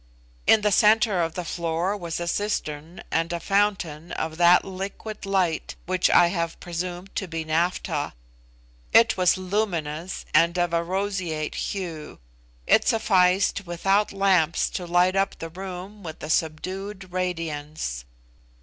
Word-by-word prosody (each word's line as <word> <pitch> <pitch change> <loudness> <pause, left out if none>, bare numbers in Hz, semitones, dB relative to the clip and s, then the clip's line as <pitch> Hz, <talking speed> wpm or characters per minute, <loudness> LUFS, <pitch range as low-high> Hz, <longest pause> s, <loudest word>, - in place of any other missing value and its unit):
In 220 - +6
the 210 0 +2
centre 210 -2 +4
of 165 -1 -2
the 180 - -4
floor 170 +3 -1
was 170 -5 -4
a 170 - -3
cistern 170 -5 -3
and 165 +1 0
a 170 - -2
fountain 180 -5 0
of 160 0 -3
that 175 +1 +6
liquid 195 +2 -6
light 185 -5 0
which 185 0 +2
I 175 -1 +6
have 170 -2 -3
presumed 175 +2 -5
to 190 - -2
be 165 -1 -4
naphtha. 165 - -1 0.8
It 230 0 +6
was 185 -1 +3
luminous 180 -4 -2
and 170 +3 +4
of 175 -1 0
a 170 - +2
roseate 185 -4 -2
hue; 170 -6 -5 0.5
it - - +4
sufficed 190 -2 +3
without 195 +4 +1
lamps 190 -5 +2
to 180 - -4
light 180 +2 +3
up 195 0 0
the 165 - -6
room 190 +3 -8
with 160 -4 -8
a 155 - -2
subdued 185 +5 -2
radiance. 155 - -3
180 Hz, 140 wpm, -25 LUFS, 165-195 Hz, 0.8 s, In